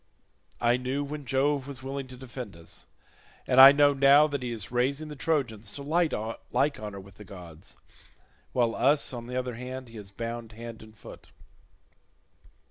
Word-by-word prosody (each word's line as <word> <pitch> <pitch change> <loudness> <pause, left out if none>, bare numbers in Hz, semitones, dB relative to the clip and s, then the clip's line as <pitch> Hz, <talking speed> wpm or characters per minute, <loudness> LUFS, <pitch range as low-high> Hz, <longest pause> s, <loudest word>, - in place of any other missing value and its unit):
I 120 +1 +3
knew 130 +3 -2
when 145 0 -6
Jove 135 +2 +1
was 135 -3 -8
willing 135 0 -5
to 130 0 -11
defend 125 -5 -8
us, 85 -1 -10 0.6
and 130 +1 +6
I 135 +1 +12
know 145 0 +4
now 140 +2 +6
that 145 -3 -3
he 125 - -3
is 115 -4 -4
raising 140 +5 0
the 150 - -7
Trojans 125 -9 -1
to 140 - -6
like 160 +3 +1 0.7
honour 105 -2 -6
with 95 -1 -15
the 105 - -10
gods, 90 -6 -11 0.7
while 120 -2 +1
us, 140 +3 +2
on 120 -1 -6
the 125 - -6
other 125 -1 -2
hand, 125 +1 -7
he 115 - -11
has 100 -2 -9
bound 115 +2 -6
hand 115 0 -9
and 110 0 -15
foot. - - -13
125 Hz, 175 wpm, -28 LUFS, 115-140 Hz, 0.7 s, I